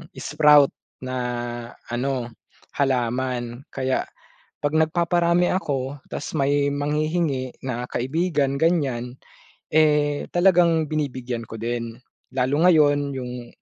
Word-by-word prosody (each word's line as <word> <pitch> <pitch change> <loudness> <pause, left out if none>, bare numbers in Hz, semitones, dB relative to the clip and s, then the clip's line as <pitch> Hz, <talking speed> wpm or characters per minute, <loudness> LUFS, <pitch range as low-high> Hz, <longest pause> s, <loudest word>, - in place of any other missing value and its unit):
sprout 150 -1 +5 0.3
na 130 0 -4 0.8
ano, 125 -1 -2 0.5
halaman. 125 -2 -1
Kaya 130 -1 -1 0.6
'pag 145 - +1
nagpaparami 170 +2 +2
ako 140 -6 -2
ta's - - -5
may 140 +1 +2
manghihingi 150 -2 -1
na 125 -1 -3
kaibigan, 140 +1 0
ganiyan, 135 -7 0 0.6
eh, 150 -2 +3
talagang 175 -3 +4
binibigyan 130 -6 -3
ko 115 - -8
din. 115 0 -3 0.4
Lalo 140 +6 +2
ngayon 145 -4 +3
yung 125 -1 -6
140 Hz, 95 wpm, -23 LUFS, 125-155 Hz, 0.8 s, sprout